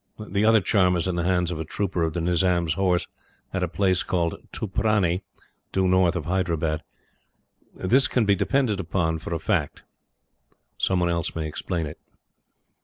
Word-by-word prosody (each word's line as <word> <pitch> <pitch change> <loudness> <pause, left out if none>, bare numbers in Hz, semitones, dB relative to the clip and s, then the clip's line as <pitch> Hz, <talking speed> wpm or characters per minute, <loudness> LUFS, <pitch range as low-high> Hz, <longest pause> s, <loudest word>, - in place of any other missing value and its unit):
[The 105 -1 -1
other 110 -1 +5
charm 90 -2 +3
is 85 +1 +1
in 90 - -1
the 85 - -1
hands 90 -1 +1
of 80 - -4
a - - -2
trooper 90 +2 -2
of 80 -1 0
the 85 - -2
Nizam's 85 -1 +2
Horse, 90 -3 +1 0.5
at 95 - -1
a 90 - +1
place 95 0 +1
called 85 -2 0 0.2
Tuprani, 100 -3 0 0.5
due 95 -1 +1
north 90 -1 +3
of 85 - -3
Hyderabad.] 85 -4 0 0.9
This 130 +9 +3
can 120 -3 +1
be 100 - +4
depended 125 -2 +1
upon 80 -2 -1
for 80 - -8
a 85 - 0
fact. - - -1 1.0
Some 95 -2 +1
one 85 - +2
else 85 -2 -1
may 80 -1 -2
explain 85 +2 -3
it. 75 - -8
90 Hz, 175 wpm, -25 LUFS, 85-95 Hz, 1.0 s, other